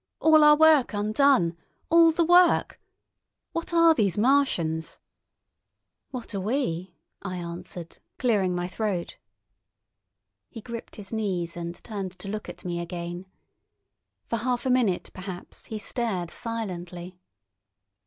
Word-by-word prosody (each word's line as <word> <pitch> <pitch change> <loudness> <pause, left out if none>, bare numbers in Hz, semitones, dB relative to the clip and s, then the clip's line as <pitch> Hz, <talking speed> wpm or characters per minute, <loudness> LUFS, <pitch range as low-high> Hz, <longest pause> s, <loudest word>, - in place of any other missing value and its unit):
All 315 -1 +6
our 300 0 +8
work 310 -7 +5
undone, 210 -4 +3 0.4
all 335 0 +7
the 330 +1 +1
work—— 350 0 +4 0.7
What 335 0 -4
are 335 -1 +6
these 205 - +1
Martians?" 205 - +1 1.1
"What 245 -3 -7
are 195 - -2
we?" 185 - -2 0.3
I 190 -2 -5
answered, 175 0 -8 0.2
clearing 200 -8 +1
my 175 0 -2
throat. 185 -2 -3 1.3
He 230 - -9
gripped 230 +1 -8
his 205 0 -9
knees 185 -6 -2
and 170 0 -5
turned 195 -5 -5
to 185 - -8
look 215 +1 -5
at - - -10
me 175 -1 -2
again. 175 +1 -6 1.0
For 230 - -2
half 245 +2 -1
a 260 - +2
minute, 230 -8 +1
perhaps, 185 -1 -8
he 220 - -5
stared 205 -6 -3
silently. 180 -6 -5
205 Hz, 125 wpm, -26 LUFS, 175-255 Hz, 1.3 s, our